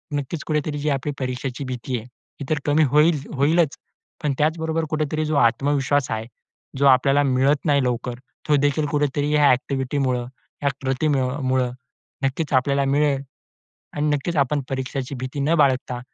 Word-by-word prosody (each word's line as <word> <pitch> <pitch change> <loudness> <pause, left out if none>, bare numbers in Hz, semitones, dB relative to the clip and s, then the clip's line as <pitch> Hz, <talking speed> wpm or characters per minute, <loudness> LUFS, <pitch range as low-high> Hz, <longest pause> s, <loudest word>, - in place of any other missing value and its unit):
नक्कीच 145 +3 -3
कुठेतरी 150 -1 -1
जी 150 +1 -1
आपली 140 +1 -1
परीक्षेची 130 +1 -3
भीती 125 0 -3
आहे, 110 - -8
ती 125 +3 -13
तर 155 - +1
कमी 150 +2 +3
होईल 150 +1 +4 0.2
होईलच 150 +2 +2 0.5
पण 145 - +1
त्याचबरोबर 160 +1 0
कुठेतरी 155 0 -1
जो 155 0 -1
आत्मविश्वास 140 +2 +2
आहे 110 0 -2 0.5
जो 140 - +2
आपल्याला 135 +2 +5
मिळत 135 +2 +2
नाही 140 -3 +3
लवकर, 125 0 -2 0.3
तो 150 - +4
देखील 145 +1 +1
कुठेतरी 145 0 0
ह्या 145 -1 +5
ॲक्टिव्हिटीमुळं, 130 -1 0 0.4
ह्या 140 - +2
कृतीमुळं 130 -2 0 0.5
नक्कीच 140 +3 -1
आपल्याला 140 +1 +2
मिळेल 140 0 +2 0.7
आणि 150 +1 -1
नक्कीच 165 +4 -3
आपण 140 +1 +2
परीक्षांची 130 0 -3
भीती 130 +3 -5
न 150 +4 +2
बाळगता 130 -3 +2
140 Hz, 150 wpm, -22 LUFS, 130-150 Hz, 0.7 s, आपल्याला